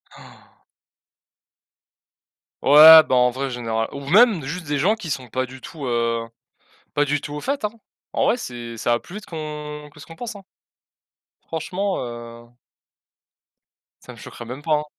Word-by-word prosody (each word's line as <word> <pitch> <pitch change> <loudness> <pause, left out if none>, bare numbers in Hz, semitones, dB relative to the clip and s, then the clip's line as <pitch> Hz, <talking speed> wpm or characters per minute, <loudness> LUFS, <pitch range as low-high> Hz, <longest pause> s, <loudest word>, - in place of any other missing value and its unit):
Han! - - -18 2.0
Ouais, 155 +3 +10
bah, 130 - -1
en 125 0 +4
vrai, 135 +2 -4
général 115 -2 -2
ou 140 - -7
même, 210 - +5
juste 165 +4 -6
des 145 0 -1
gens 205 +9 +2
qui 170 -7 -8
sont 130 -3 -4
pas 130 +3 -2
du 130 +1 -12
tout, 145 +1 -8
heu, 115 -1 -1 0.7
pas 145 0 +2
du 145 0 0
tout 145 - -8
au 150 - -5
fait, 275 -5 -2
hein. 210 - -2 0.4
En - - +1
vrai, 240 - +2
c'est 120 - -7
ça 120 - -1
va 120 - +2
plus 185 - -13
vite 210 - -8
qu'on 150 -2 -7
que 150 - -18
ce - - -11
qu'on 165 - -13
pense, 235 0 -7
hein 195 - -12 1.0
franchement, 185 +5 -3
heu 120 -1 -8 1.6
ça - - -11
me - - -15
choquerait 120 - -10
même 130 +5 -8
pas, 155 -1 +2
hein. - - -7
145 Hz, 175 wpm, -22 LUFS, 120-165 Hz, 2.0 s, Ouais